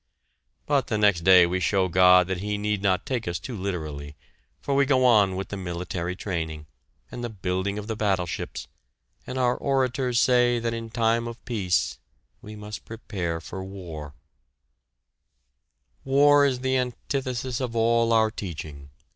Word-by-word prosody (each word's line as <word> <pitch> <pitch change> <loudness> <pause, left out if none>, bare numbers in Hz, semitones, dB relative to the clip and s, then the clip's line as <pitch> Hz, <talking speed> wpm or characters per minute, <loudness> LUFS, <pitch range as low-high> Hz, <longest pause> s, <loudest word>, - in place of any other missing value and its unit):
But 140 -2 +1
the 110 - -1
next 100 -5 +3
day 90 0 +7
we 90 +2 -1
show 95 +1 +1
God 90 0 +6
that 95 0 -3
he 105 +2 -2
need 105 -1 -1
not 95 -2 +1
take 125 -6 -3
us 85 0 -1
too 125 - -7
literally, 75 -7 -5 0.4
for 140 - -2
we 140 0 +4
go 130 -2 +3
on 105 -6 +4
with 95 +1 -5
the 100 - -5
military 90 -1 -4
training, 80 -6 -4 0.5
and 120 - -6
the 120 - -3
building 95 -1 -2
of 105 - -5
the 110 0 -3
battleships, 95 -5 -2 0.6
and 130 - -5
our 125 -1 +2
orators 130 -2 0
say 120 -1 +4
that 115 0 -2
in 115 0 -5
time 115 0 +1
of 115 0 -9
peace 90 - 0 0.4
we 105 +1 -10
must 105 0 -8
prepare 90 -7 -4
for 95 +3 -7
war. 85 -7 -8 1.9
War 145 +1 +5
is 125 -2 -2
the 130 0 +1
antithesis 125 0 -3
of 120 -2 -3
all 115 0 +2
our 110 -1 +3
teaching. 75 -8 -7
105 Hz, 160 wpm, -25 LUFS, 90-120 Hz, 1.9 s, day